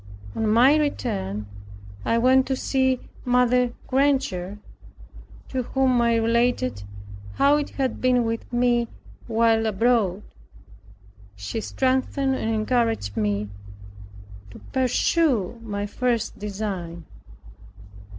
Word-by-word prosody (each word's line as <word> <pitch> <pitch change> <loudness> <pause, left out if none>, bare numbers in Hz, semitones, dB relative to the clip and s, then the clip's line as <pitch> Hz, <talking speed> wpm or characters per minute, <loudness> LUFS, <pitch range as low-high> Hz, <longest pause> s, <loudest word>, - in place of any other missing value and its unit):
On 220 - 0
my 245 +7 +5
return, 105 - -2 0.6
I 230 - +1
went 260 +2 +4
to 265 - 0
see 260 -1 0 0.2
Mrs. 250 0 +2
Granger, 260 -9 0 0.9
to 260 - -1
whom 255 0 +1
I 235 -1 +3
related 230 - +1 0.5
how 285 +1 +4
it 295 - -2
had 265 -3 -3
been 250 -1 +3
with 230 +1 -4
me 240 -1 +2 0.4
while 225 -1 +2
abroad. 210 -2 +1 1.1
She 100 - -5
strengthened 265 +2 0
and 225 - -2
encouraged 225 - 0
me 105 -1 -1 1.0
to - - -12 0.2
pursue 255 - +1
my 205 -2 -4
first 230 +1 -2
design. 190 -5 -5
235 Hz, 100 wpm, -24 LUFS, 205-255 Hz, 1.1 s, my